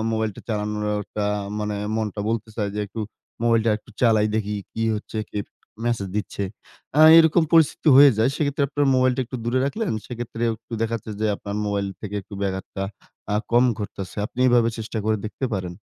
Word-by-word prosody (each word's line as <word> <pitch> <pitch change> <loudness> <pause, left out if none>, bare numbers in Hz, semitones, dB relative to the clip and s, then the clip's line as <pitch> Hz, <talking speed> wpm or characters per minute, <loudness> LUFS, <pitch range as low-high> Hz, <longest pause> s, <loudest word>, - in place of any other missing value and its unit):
মোবাইলটা 110 -2 -2
চালানোটা 105 -1 -2 0.3
মানে 105 -1 -2 0.2
মনটা 110 -2 -2
বলতে 115 -1 -2
চায় 105 -2 -1
যে, 105 - -3
"একটু 110 +3 -7 0.4
মোবাইলটা 115 -1 +3
একটু 110 - -19
চালাই 110 -3 +4
দেখি, 105 -1 -1 0.2
কি 115 - -3
হচ্ছে? 110 +1 -6
কে - - -4 0.5
মেসেজ 115 -5 -1
দিচ্ছে?" 100 -1 -3 0.5
আ - - +7 0.2
এরকম 160 +1 +5
পরিস্থিতি 165 -1 +4
হয়ে 140 0 +9
যায়। 120 +4 +3
সেক্ষেত্রে 145 -1 0
আপনার 145 0 +1
মোবাইলটা 130 0 +3
একটু 130 +2 -6
দূরে 120 +2 +1
রাখলেন। 210 - -2
সেক্ষেত্রে 120 -1 -6
একটু 115 - -9
দেখাচ্ছে 115 -1 -3
যে 110 - +2
আপনার 100 +1 -5
মোবাইল 100 -1 -1
থেকে 105 -1 -6
একটু 100 - -11
ব্যাঘাতটা 95 0 -3 0.5
আ - - +3 0.2
কম 120 +1 +6
ঘটতেছে। 100 -3 -6
আপনি 125 - -7
এভাবে 120 -1 +4
চেষ্টা 110 0 -4
করে 110 0 +2
দেখতে 130 +5 -3
পারেন। 90 -3 -4
110 Hz, 175 wpm, -23 LUFS, 105-120 Hz, 0.5 s, হয়ে